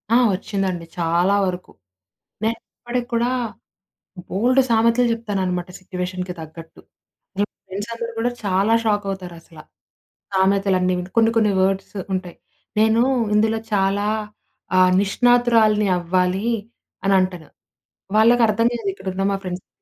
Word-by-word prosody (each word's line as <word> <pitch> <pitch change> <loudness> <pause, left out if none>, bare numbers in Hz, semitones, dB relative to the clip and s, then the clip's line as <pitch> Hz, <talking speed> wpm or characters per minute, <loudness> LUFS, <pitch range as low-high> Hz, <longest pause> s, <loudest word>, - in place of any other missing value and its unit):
ఆ! - - +7 0.2
వచ్చిందండి 185 -2 -3
చాలా 170 +4 +2
వరకు. 180 -1 -4 0.7
నేను 225 +1 0 0.2
ఇప్పటికి 240 0 -3
కూడా 235 +1 +2 1.0
బోలెడు 250 +7 +3
సామెతలు 230 +2 +3
చెప్తాననమాట 190 -6 -2
సిట్యుయేషన్‌కి 180 0 -5
తగ్గట్టు. 160 +1 -11 0.6
మా 205 - +3 0.2
ఫ్రెండ్స్ 200 +4 -6
అందరూ 230 0 -5
కూడా 240 +2 +1
చాలా 200 +3 +2
షాకవుతారసల. 190 -6 -3 0.8
సామెతలన్నీ 190 -1 +2
విని. 180 +1 -5
కొన్ని, 225 0 +5
కొన్ని 215 -2 +3
వర్డ్స్ 195 +2 -1 0.2
ఉంటాయి. 185 -2 -4 0.4
"నేను 220 +1 +4 0.3
ఇందులో 220 +1 +2
చాలా 200 +1 +1 0.7
ఆహ్ 185 0 +5
నిష్ణాతురాల్ని 225 -1 +3
అవ్వాలి" 180 +5 0 0.6
అనంటాను. 185 -5 +1 0.7
వాళ్ళకర్థం 230 0 +4
కాదు 225 -4 -3
ఇకడున్న 190 0 -4
మా 195 - 0
ఫ్రెండ్స్‌కి. 180 0 -6
195 Hz, 110 wpm, -21 LUFS, 185-225 Hz, 1.0 s, ఆ